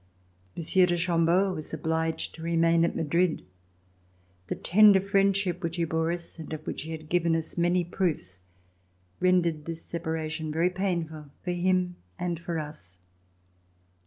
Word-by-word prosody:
Monsieur 180 +2 +3
de 175 0 +1
Chambeau 170 +2 +2
was 155 -2 -4
obliged 160 +1 -1
to 160 - -11
remain 165 0 +3
at 170 - 0
Madrid. 165 - +1 1.0
The - - -2
tender 205 +1 +6
friendship 195 -2 +1
which 165 -2 -2
he 170 - 0
bore 160 0 0
us, 170 -1 -5
and 160 - -8
of 155 0 -6
which - - -4
he 160 - -6
had 155 -1 -7
given 170 0 +2
us 160 -1 -1
many 175 +1 +2
proofs, 160 - -2 0.8
rendered 170 -4 +2
this 165 0 -5
separa 160 -1 -3
tion 155 -1 -4
very 165 +4 +2
painful 170 -5 -2 0.2
for 180 - -2
him 180 0 +1 0.2
and 175 -2 -2
for 170 0 -3
us. 150 - -6
170 Hz, 155 wpm, -28 LUFS, 160-180 Hz, 1.0 s, tender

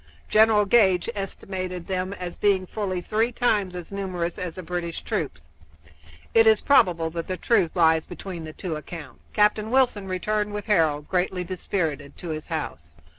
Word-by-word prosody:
General 215 -1 +5
Gage 195 -2 +4
estimated 185 -3 -5
them 185 0 -2
as 180 -2 -6
being 195 -2 +2
fully 185 -2 -3
three 220 +6 0
times 210 -7 +1
as 175 0 -7
numerous 185 -3 -3
as 180 -3 -4
the 185 - -7
British 170 -1 -4
troops. 80 -1 -4 0.8
It 225 0 +6
is 220 -1 +6
probable 170 -12 +3
that 165 0 -4
the 185 - -3
truth 180 -8 +2
lies 160 -2 +4
between 175 -1 -7
the 155 - -7
two 175 -2 -4
accounts. 150 -2 -8
Captain 210 +1 +3
Wilson 245 -6 +2
returned 210 +3 -1
with 210 0 -4
Harold, 160 -8 +2
greatly 180 0 0
dispirited, 165 -5 -3
to 175 - -7
his 155 -1 -4
house. 80 - -5
185 Hz, 165 wpm, -25 LUFS, 165-205 Hz, 0.8 s, It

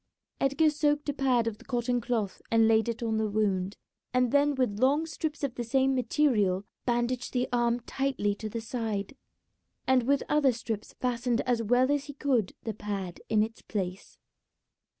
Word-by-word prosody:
Edgar 275 +3 +3
soaked 295 0 +1
a - - 0
pad 260 -4 +2
of 225 -2 -3
the - - -14
cotton 245 -1 -1
cloth 220 -4 -2
and 225 -1 +4
laid 225 +1 +3
it 235 +1 -3
on 220 -1 0
the 220 -1 0
wound, 200 -2 0 0.4
and 250 -2 +3
then 285 0 +3
with 245 -6 0
long 280 +5 +3
strips 315 -2 -4
of 275 -3 -1
the 245 - -4
same 265 +3 +2
material 225 -7 +2 0.2
bandaged 240 +1 0
the 250 -1 +1
arm 240 0 +2
tightly 260 -5 -1
to 215 +1 -6
the 230 +2 -4
side, 225 -1 -3 0.7
and 260 -1 +4
with 275 +3 +1
other 285 -4 +3
strips 225 -2 -5
fastened 245 -1 0
as 245 -2 0
well 245 +4 +3
as 290 -1 0
he 285 - -8
could 260 -8 0
the 220 - -3
pad 200 -4 -5
in 215 -1 +4
its 225 +1 -6
place. 190 -2 -5
240 Hz, 180 wpm, -29 LUFS, 220-270 Hz, 0.7 s, and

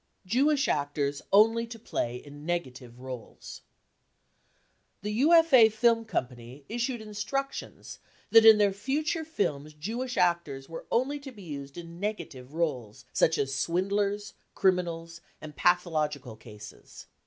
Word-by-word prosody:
Jewish 275 +8 +2
Actors 145 -1 -1
only 225 +3 +5
to 230 0 -9
play 120 - -3
in 145 +3 -11
negative 130 -8 -4
roles. 130 -3 -9 1.4
The 210 - -2
UFA 280 -2 +6
Film 230 +1 +2
Company 125 - -5
issued 240 +1 -2
instructions 220 +6 -5 0.3
that 225 0 +8
in 220 -1 +9
their 205 -2 +3
future 300 - -1
films 155 - -3
Jewish 235 +11 -4
actors 170 -6 0
were 165 - -9
only 270 +5 +1
to 280 -1 -9
be 210 -5 -13
used 140 -3 -8
in 170 0 -9
negative 160 -10 -5
roles, 125 -9 -3
such 160 - +3
as 135 0 -1
swindlers, 200 +7 -1 0.2
criminals 170 -3 0 0.2
and 150 -1 -10
pathological 155 -8 0
cases. 105 -2 -13
175 Hz, 125 wpm, -28 LUFS, 140-225 Hz, 1.4 s, in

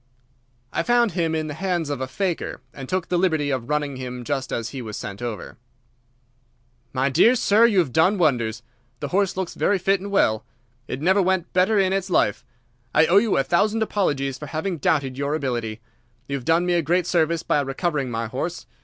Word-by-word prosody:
"I - - +1
found 240 +3 +3
him 165 -2 0
in 155 -1 -1
the 150 - -5
hands 175 -3 -2
of 140 -2 -3
a 130 - -2
faker, 180 +4 -3
and 135 -1 -9
took 185 -2 -1
the 175 0 +1
liberty 160 -6 +1
of 130 -2 -3
running 145 -2 -1
him 125 -1 -6
just 135 +1 -3
as 115 0 -2
he 135 0 -6
was 110 -3 -6
sent 100 +2 -7
over." 115 -5 -6 1.3
"My 130 +1 0
dear 230 - +5
sir, 225 0 +4
you 215 -4 0
have 160 -9 +2
done 185 +6 +4
wonders. 120 - +1 0.4
The 145 - -4
horse 195 +1 +1
looks 190 -2 -3
very 205 - +1
fit 195 +1 +1
and 200 - -6
well. 110 - +2 0.4
It 130 - -5
never 190 +5 +4
went 185 -1 0
better 185 +4 +3
in 190 -1 +3
its 195 0 -1
life. 105 - +1 0.5
I 150 - +6
owe 180 +4 +4
you 210 0 +3
a 135 - +3
thousand 210 +8 +2
apologies 140 -11 -1
for 150 - -7
having 160 +3 -3
doubted 135 -3 0
your 140 +2 0
ability. 120 -6 -3 0.5
You 140 - -2
have 130 -3 -6
done 165 +2 +3
me 180 - +1
a 170 - +3
great 175 +3 +1
service 170 -2 +1
by 145 - +1
recovering 140 0 -2
my 115 -1 -2
horse. 135 +10 -4
160 Hz, 205 wpm, -23 LUFS, 130-185 Hz, 1.3 s, I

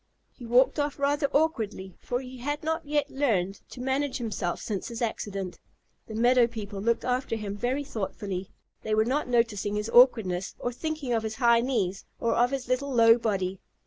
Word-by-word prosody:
He 240 - -10
walked 255 +5 +4
off 290 -1 -1
rather 280 +1 +1
awkwardly, 220 - -1
for 245 +1 -2
he 255 -1 -10
had 290 +4 -3
not 320 +1 -1
yet 290 -1 0
learned 200 -9 0
to - - -10
manage 265 +2 -1
himself 215 -8 -3
since 200 -4 -4
his 230 -1 -6
accident. 200 -5 -3 0.5
The 220 - -7
meadow 240 +1 +4
people 210 -4 -6
looked 235 +2 +1
after 250 -1 0
him 205 -2 -4
very 250 +7 -1
thoughtfully. 195 -6 -4 0.3
They 215 0 0
were 220 0 +3
not 270 +4 0
noticing 230 -4 +1
his 210 +2 -2
awkwardness, 220 -8 +4
or 245 - -3
thinking 310 -2 -3
of 225 - +1
his 220 0 -4
high 235 -1 +4
knees 200 -7 -1 0.2
or 235 - +1
of 245 +1 +3
his 270 -2 -3
little 260 +3 0
low 230 -1 +6
body. 195 -4 -1
235 Hz, 185 wpm, -27 LUFS, 210-265 Hz, 0.5 s, low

